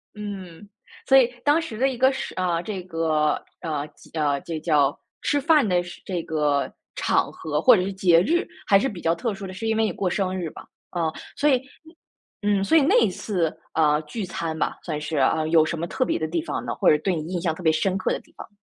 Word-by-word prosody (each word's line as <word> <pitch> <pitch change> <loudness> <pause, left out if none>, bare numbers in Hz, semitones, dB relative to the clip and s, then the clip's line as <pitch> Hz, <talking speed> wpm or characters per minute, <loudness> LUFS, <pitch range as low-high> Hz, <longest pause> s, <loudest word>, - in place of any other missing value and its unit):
嗯， 200 -3 -8 0.4
所 270 - +7
以 255 - +6 0.2
当 295 +3 +4
时 235 -10 -7
的 265 +3 +2
一 255 - -5
个 260 +2 +4
是 265 - -5
啊， 175 -2 0
这 195 -1 -5
个， 160 -3 0 0.2
呃， 150 -3 -3
几 - - -19
呃， 145 -3 0
这 160 -2 -5
叫 150 -3 +2 0.2
吃 290 - +1
饭 300 -5 +4
的 180 -1 +2
是 175 - -11
这 180 -3 -2
个 150 -3 0 0.2
场 - - +1
合 150 -1 -3
或 250 +7 +7
者 185 - +1
是 195 +1 -3
节 175 -3 +4
日， 340 - +1 0.2
还 195 -1 +6
是 270 - 0
比 185 -5 -8
较 165 - +2
特 205 +6 -2
殊 200 0 -7
的， 185 - -7
是 225 +4 -4
因 220 - +1
为 225 - +3
你 220 - +1
过 185 -2 -1
生 185 0 -1
日 170 -3 -3
吧。 - - -12 0.2
啊， 165 -3 -1 0.2
所 295 - +2
以 260 -3 +3 0.8
嗯， 205 -1 +2
所 320 +11 +4
以 310 - +6
那 275 - +3
一 225 - +3
次， 180 -3 -2 0.2
呃， 150 -2 +3
聚 200 +8 -5
餐 165 -3 -4
吧， - - -1
算 150 -3 -4
是， 150 0 -3
呃， 155 +4 +2
有 160 -1 +5
什 165 - -3
么 170 +2 -3
特 255 - -1
别 - - 0
的 160 - -1
地 165 +1 -1
方 - - -4
呢？ - - -2
或 - - 0
者 150 - +5
对 180 +3 0
你 160 +3 -5
印 175 - -1
象 165 -2 0
特 175 - -10
别 160 - +5
深 185 +4 +1
刻 190 - -1
的 - - -3
地 - - -24
方。 - - -9
180 Hz, 265 characters per minute, -24 LUFS, 160-210 Hz, 0.8 s, 所